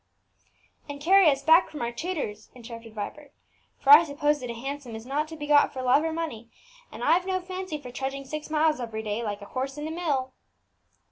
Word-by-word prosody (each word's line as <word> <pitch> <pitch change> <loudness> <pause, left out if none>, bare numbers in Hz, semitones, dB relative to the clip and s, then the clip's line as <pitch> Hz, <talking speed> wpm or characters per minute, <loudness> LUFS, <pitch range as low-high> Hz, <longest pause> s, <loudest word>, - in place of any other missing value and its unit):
"And 285 0 -6
carry 370 +3 +6
us 275 -1 0
back 325 +4 +5
from 295 -5 -6
our 235 - -2
tutor's," 235 - -5
interrupted 230 -2 -11
Vibert; 280 +8 -7 0.4
"for 275 - +3
I 300 +4 +11
suppose 295 -1 0
that 250 -2 -6
a 235 - -4
hansom 270 -1 -6
is 220 +1 -8
not 290 +4 -1
to 320 - -9
be 295 -2 -6
got 290 0 +4
for 260 -1 -5
love 255 +4 +4
or 325 - -1
money; 305 -9 -5 0.4
and - - -8
I've 360 +3 +3
no 375 -1 0
fancy 370 -3 -5
for 250 -3 -10
trudging 270 +2 -4
six 305 +3 -6
miles 310 -1 +2
every 225 -2 -5
day, 210 +1 -2
like 205 -2 -4
a - - -14
horse 270 +2 -3
in 295 +1 -4
a - - -5
mill." 285 -7 -2
285 Hz, 215 wpm, -26 LUFS, 240-315 Hz, 0.4 s, I